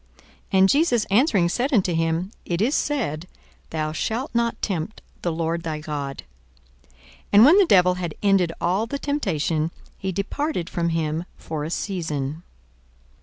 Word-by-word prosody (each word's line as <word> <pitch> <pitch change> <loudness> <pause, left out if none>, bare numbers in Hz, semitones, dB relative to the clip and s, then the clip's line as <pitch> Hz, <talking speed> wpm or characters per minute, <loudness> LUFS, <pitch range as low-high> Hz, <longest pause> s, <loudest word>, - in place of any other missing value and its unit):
42:004:012 - - -26 0.3
And 190 0 +6
Jesus 275 - +3
answering 205 - +4
said 250 - -1
unto 190 -8 +2
him, 165 +3 0
It 170 -1 -2
is 235 +8 +2
said, 200 - -1 0.4
Thou 155 -1 -2
shalt 230 - -3
not 235 0 0
tempt 190 +1 -3 0.2
the 175 - -1
Lord 165 +1 -1
thy 160 -2 -3
God. 145 -3 -5 0.6
42:004:013 65 +1 -31 0.4
And 210 +3 +9
when 320 +8 +7
the 400 - +6
devil 180 - +5
had 175 -3 -4
ended 195 -4 +3
all 190 +6 0
the 280 - -3
temptation, 165 - -1 0.3
he 190 - -2
departed 200 - -2
from 170 -1 0
him 165 0 -1
for 155 -2 -5
a 155 - -3
season. 160 -6 -3
180 Hz, 160 wpm, -23 LUFS, 160-225 Hz, 0.6 s, And